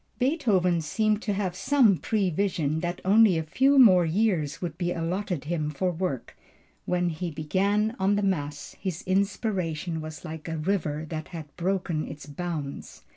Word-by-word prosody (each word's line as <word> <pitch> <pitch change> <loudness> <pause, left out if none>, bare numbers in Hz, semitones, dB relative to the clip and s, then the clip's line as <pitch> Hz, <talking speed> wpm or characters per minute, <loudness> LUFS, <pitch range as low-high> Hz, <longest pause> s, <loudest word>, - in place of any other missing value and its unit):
Beethoven 210 - +2
seemed 215 +7 0
to 210 - -1
have 190 -3 -2
some 250 -1 +4
prevision 180 -7 0
that 175 +1 -3
only 205 -2 +6
a 160 - -1
few 270 - +3
more 190 -9 +8
years 170 -4 0
would 170 -4 -4
be 175 0 -1
allotted 175 0 -2
him 155 -1 -2
for 180 +5 -1
work; 170 -7 -4 0.5
when 180 -1 +1
he 170 +2 -3
began 195 +8 0
on 195 +2 +3
the 205 - 0
mass 145 -7 -2
his 180 -4 -4
inspiration 185 -4 -1
was 155 +2 -8
like 160 -2 -7
a 165 0 -3
river 155 -3 -1
that 155 -1 -5
had 155 -5 -9
broken 180 -3 -1
its 145 -1 -9
bounds. 150 -2 -6
175 Hz, 160 wpm, -27 LUFS, 155-200 Hz, 0.5 s, more